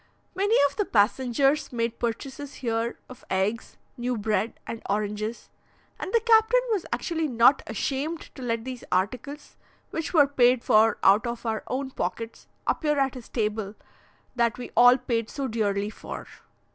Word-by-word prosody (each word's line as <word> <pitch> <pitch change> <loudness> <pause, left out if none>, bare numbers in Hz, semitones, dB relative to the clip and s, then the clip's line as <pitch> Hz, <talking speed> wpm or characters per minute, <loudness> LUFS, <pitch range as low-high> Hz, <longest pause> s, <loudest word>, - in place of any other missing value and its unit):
Many 400 +4 +2
of 280 - -12
the 415 - +1
passengers 260 - +2
made 230 -1 -2
purchases 265 +4 -4
here 230 -1 -2
of 255 - -13
eggs, 195 +4 -1 0.2
new 245 0 -2
bread, 215 +1 -1
and 230 - -6
oranges, 210 +2 -3 0.5
and - - -5
the 465 - +4
captain 450 +1 +5
was 405 -5 -1
actually 325 -2 -1
not 245 +2 +5
ashamed 280 +9 -2
to 265 - -11
let 230 -2 -2
these 255 -2 -6
articles, 250 +10 -2 0.3
which 325 0 -3
were 305 -5 +6
paid 250 -3 +3
for 220 -1 +4
out 205 +4 +5
of 235 0 -5
our 220 -1 -1
own 265 +1 -3
pockets, 230 -2 -5 0.2
appear 300 -2 +1
at 270 -1 +1
his 250 -3 -10
table 210 -2 -2 0.6
that 235 -1 +1
we 245 - -7
all 245 +1 +7
paid 235 -3 -2
so 275 -2 -3
dearly 210 -3 -1
for. - - -8
240 Hz, 160 wpm, -26 LUFS, 225-280 Hz, 0.6 s, all